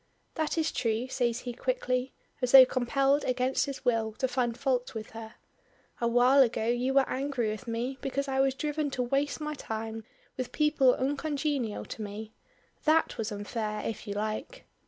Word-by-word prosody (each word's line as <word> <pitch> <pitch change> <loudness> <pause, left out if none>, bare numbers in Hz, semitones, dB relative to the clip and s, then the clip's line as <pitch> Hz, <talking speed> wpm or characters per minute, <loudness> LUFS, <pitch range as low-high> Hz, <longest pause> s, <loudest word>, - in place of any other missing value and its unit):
"That 315 0 -1
is 320 -1 +1
true," 230 +1 -1
says 240 -2 0
he 245 - -5
quickly, 260 - -1 0.3
as 250 0 0
though 265 -1 +12
compelled 275 +3 +1
against 255 +2 +1
his 275 -1 -6
will 225 -3 +1
to 260 - -1
find 245 -2 -1
fault 250 -3 -1
with 215 -1 -6
her. 225 0 -9 0.7
"A 235 - +2
while 245 +4 +5
ago 235 -3 +2
you 245 +3 0
were 275 -1 +5
angry 260 -4 -1
with 215 +4 -7
me 240 +3 -3
because 275 +1 -2
I 265 0 -1
was 270 -1 +3
driven 300 +1 -1
to 250 - +1
waste 275 +5 0
my 300 0 -3
time 225 -4 -5 0.3
with 255 -2 -3
people 300 -4 +3
uncongenial 280 -4 -1
to - - -7
me. 215 +1 -6 0.5
That 315 -4 +3
was 220 0 -2
unfair 210 +1 -3
if 225 0 -5
you 200 - -3
like." 215 - -4
255 Hz, 175 wpm, -29 LUFS, 225-275 Hz, 0.7 s, though